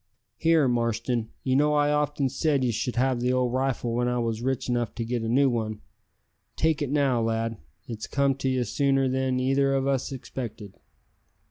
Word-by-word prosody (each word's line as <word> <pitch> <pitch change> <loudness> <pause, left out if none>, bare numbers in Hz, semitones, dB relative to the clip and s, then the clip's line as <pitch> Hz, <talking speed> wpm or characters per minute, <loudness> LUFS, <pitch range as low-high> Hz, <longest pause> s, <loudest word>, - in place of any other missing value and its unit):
"Here, 160 -2 +3
Marston, 115 -1 -1
you 130 -1 +1
know 150 +2 +3
I 145 0 +3
often 150 -1 +1
said 140 +1 0
ye 125 - +1
should 120 +3 -2
have 130 0 +1
the 125 +1 +1
old 125 -1 +1
rifle 130 -2 -1
when 120 +1 0
I 125 0 0
was 115 -2 -1
rich 130 +1 -1
enough 120 -3 -1
to 115 - -3
get 120 0 -2
a 115 - -2
new 135 +4 +4
one. 110 -4 -2 0.8
Take 160 -2 +1
it 145 - -1
now, 135 -4 +2
lad. 115 0 -1 0.3
It's 110 -3 -6
come 140 -1 +2
to 135 -1 -1
ye 130 -1 +1
sooner 135 +3 +1
than 130 0 0
either 135 +1 +2
o' 135 0 0
us 135 0 -1
expected." 115 -6 -7
130 Hz, 195 wpm, -26 LUFS, 120-135 Hz, 0.8 s, new